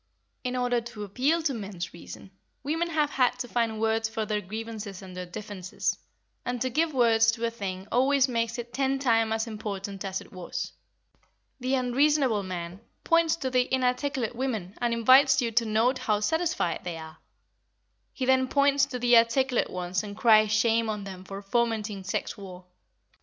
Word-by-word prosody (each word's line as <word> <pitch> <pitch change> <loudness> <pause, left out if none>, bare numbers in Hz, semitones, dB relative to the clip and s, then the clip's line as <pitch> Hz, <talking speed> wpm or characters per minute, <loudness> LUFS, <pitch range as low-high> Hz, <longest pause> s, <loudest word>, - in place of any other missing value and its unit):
In 250 0 -2
order 245 -1 +1
to 230 -3 -8
appeal 270 - 0
to 295 -4 +1
men's 195 -6 -6
reason, 170 +3 -11 0.3
women 325 +4 -1
have 305 -3 +1
had 250 -1 +2
to 250 0 -4
find 230 -2 -1
words 225 0 +1
for 220 0 -3
their 210 0 -1
grievances 215 -1 -6
and 185 -1 -10
their 180 0 -5
differences, 200 -1 -4 0.5
and 245 0 -3
to 255 +2 -1
give 320 +4 +1
words 230 -4 +4
to 230 0 -2
a 230 - -1
thing 195 -4 -5
always 270 +2 +3
makes 230 -2 -1
it 240 0 -7
ten 270 0 +1
times 225 -4 +2
as 220 +1 0
important 200 -3 -5
as 190 -1 -3
it - - -14
was. 180 -2 -5 0.9
The 260 +1 0
unreasonable 260 -2 +2
man 180 0 -6 0.2
points 335 -1 +3
to 265 -5 -3
the 250 -1 +1
inarticulate 255 -1 0
women 225 -8 -3
and 240 -1 0
invites 260 +4 +6
you 235 -3 0
to 230 +1 +2
note 225 +4 +2
how 210 -1 +1
satisfied 320 - 0
they 175 -2 -4
are; 160 0 -10 0.9
he 260 - -3
then 260 0 +3
points 280 0 +3
to 255 - -4
the 245 0 +4
articulate 245 +2 +2
ones 180 0 -2
and 205 -1 -8
cries 215 -2 +5
shame 225 +1 +2
on 210 -2 -3
them 190 -2 -8
for 195 +1 -8
fomenting 215 -2 -1
sex 185 - -2
war. 185 -2 -10
230 Hz, 180 wpm, -27 LUFS, 205-255 Hz, 0.9 s, invites